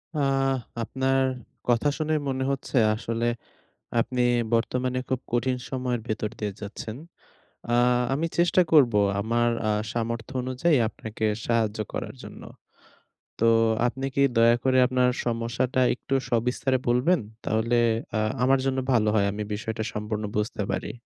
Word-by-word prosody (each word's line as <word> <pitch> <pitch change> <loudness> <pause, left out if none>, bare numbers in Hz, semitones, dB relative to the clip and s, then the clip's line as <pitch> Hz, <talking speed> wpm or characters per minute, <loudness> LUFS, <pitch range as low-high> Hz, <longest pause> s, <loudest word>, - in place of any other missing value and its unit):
আ - - -2 0.7
আপনার 135 +2 0 0.5
কথা 120 +4 +3
শুনে 155 0 -1 0.2
মনে 130 0 -1
হচ্ছে 135 -1 -3 0.2
আসলে 115 +1 -3 0.7
আপনি 125 +1 0 0.3
বর্তমানে 125 +2 0
খুব 130 -1 0
কঠিন 125 +1 +1
সময়ের 125 -3 -2
ভেতর 110 -1 -2
দিয়ে 105 -1 -2
যাচ্ছেন। 110 +2 -6 0.8
আ - - +4 0.4
আমি 155 +4 0
চেষ্টা 175 +1 +4
করব 140 -7 +6 0.3
আমার 120 +3 +1 0.2
আ - - +2 0.2
সামর্থ্য 115 -1 -3
অনুযায়ী 130 +6 +1
আপনাকে 110 0 -6 0.2
সাহায্য 115 -2 +1
করার - - -4
জন্য। - - -10 1.0
তো 115 - +4 0.4
আপনি 135 +2 -3
কি 140 - +3
দয়া 115 +1 +6
করে 130 -1 +3
আপনার 125 -1 +2 0.2
সমস্যাটা 120 +2 0
একটু 135 - -4 0.2
সবিস্তারে 125 +3 +1
বলবেন? 130 +9 +3 0.2
তাহলে 110 +2 +1 0.4
আ - - +1 0.3
আমার 135 +1 +4
জন্য 135 0 0
ভালো 110 -3 +3
হয়। 100 -2 +3
আমি 105 +1 -4
বিষয়টা 110 +1 -4
সম্পূর্ণ 105 0 -3
বুঝতে 105 0 -1
পারি। - - -3
120 Hz, 135 wpm, -26 LUFS, 115-130 Hz, 1.0 s, করব